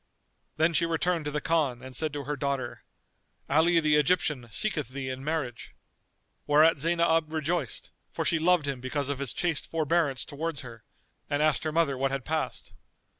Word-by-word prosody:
Then 160 Hz, +2 st, +3 dB
she 170 Hz, +1 st, +2 dB
returned 165 Hz, 0 st, 0 dB
to -, -, -1 dB
the 150 Hz, 0 st, -2 dB
Khan 145 Hz, -7 st, 0 dB
and 130 Hz, -1 st, -9 dB
said 155 Hz, +4 st, 0 dB
to 145 Hz, -1 st, -4 dB
her 150 Hz, +2 st, -3 dB
daughter, 135 Hz, -3 st, -3 dB, 0.6 s
"Ali 165 Hz, +4 st, +4 dB
the 150 Hz, -2 st, +3 dB
Egyptian 150 Hz, -5 st, +1 dB
seeketh 155 Hz, -, +1 dB
thee 130 Hz, 0 st, -5 dB
in 130 Hz, +1 st, -5 dB
marriage." 145 Hz, -6 st, -3 dB, 0.7 s
Whereat 155 Hz, +1 st, +5 dB
Zaynab 165 Hz, 0 st, +2 dB
rejoiced, 160 Hz, -4 st, -2 dB, 0.2 s
for -, -, -3 dB
she 165 Hz, -, +2 dB
loved 170 Hz, -2 st, +3 dB
him 135 Hz, -3 st, -3 dB
because 140 Hz, +2 st, -2 dB
of 140 Hz, -2 st, -2 dB
his 140 Hz, -3 st, -2 dB
chaste 165 Hz, -4 st, -1 dB
forbearance 160 Hz, -3 st, +1 dB
towards 155 Hz, 0 st, -4 dB
her,[FN#242] 115 Hz, -3 st, -10 dB, 0.5 s
and 145 Hz, +1 st, +1 dB
asked 155 Hz, -1 st, +2 dB
her 155 Hz, -, 0 dB
mother 150 Hz, -5 st, +1 dB
what 135 Hz, 0 st, +1 dB
had 135 Hz, -2 st, -4 dB
passed. 160 Hz, 0 st, -3 dB
150 Hz, 175 wpm, -28 LUFS, 135-165 Hz, 0.7 s, Whereat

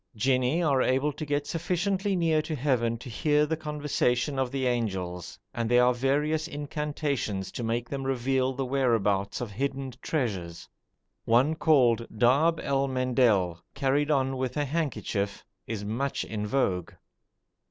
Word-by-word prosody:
Jinni 130 Hz, +7 st, +2 dB
are 140 Hz, -5 st, +3 dB
able 135 Hz, +4 st, +2 dB
to 155 Hz, +1 st, -6 dB
get 145 Hz, 0 st, 0 dB
sufficiently 185 Hz, +4 st, -1 dB
near 165 Hz, -3 st, +2 dB
to 155 Hz, 0 st, -4 dB
heaven 120 Hz, -4 st, +1 dB
to 125 Hz, -, -11 dB
hear 150 Hz, +5 st, +2 dB
the 160 Hz, +2 st, -1 dB
conversation 150 Hz, -3 st, -1 dB
of 130 Hz, -2 st, 0 dB
the 135 Hz, 0 st, -2 dB
angels, 95 Hz, -8 st, -2 dB, 0.2 s
and 115 Hz, -1 st, -2 dB
there 125 Hz, 0 st, +5 dB
are 125 Hz, -, +4 dB
various 150 Hz, +5 st, 0 dB
incantations 145 Hz, -, -3 dB
to -, -, -5 dB
make 115 Hz, +1 st, -1 dB
them 135 Hz, +1 st, -4 dB
reveal 130 Hz, 0 st, 0 dB
the 135 Hz, 0 st, -3 dB
whereabouts 115 Hz, -8 st, +1 dB
of 120 Hz, -4 st, -4 dB
hidden 135 Hz, +3 st, -3 dB
treasures. 95 Hz, -, -3 dB, 0.6 s
One 125 Hz, +7 st, +4 dB
called 125 Hz, -8 st, +3 dB
darb 145 Hz, +8 st, +4 dB
el 140 Hz, 0 st, +1 dB
mendel, 120 Hz, -10 st, +2 dB
carried 140 Hz, +2 st, +1 dB
on 135 Hz, -2 st, +1 dB
with 130 Hz, 0 st, -3 dB
a 145 Hz, -, +1 dB
handkerchief, 130 Hz, -10 st, -2 dB, 0.2 s
is 105 Hz, -2 st, -4 dB
much 125 Hz, +6 st, -2 dB
in 105 Hz, -1 st, -4 dB
vogue. 95 Hz, -9 st, 0 dB
130 Hz, 150 wpm, -28 LUFS, 115-150 Hz, 0.6 s, there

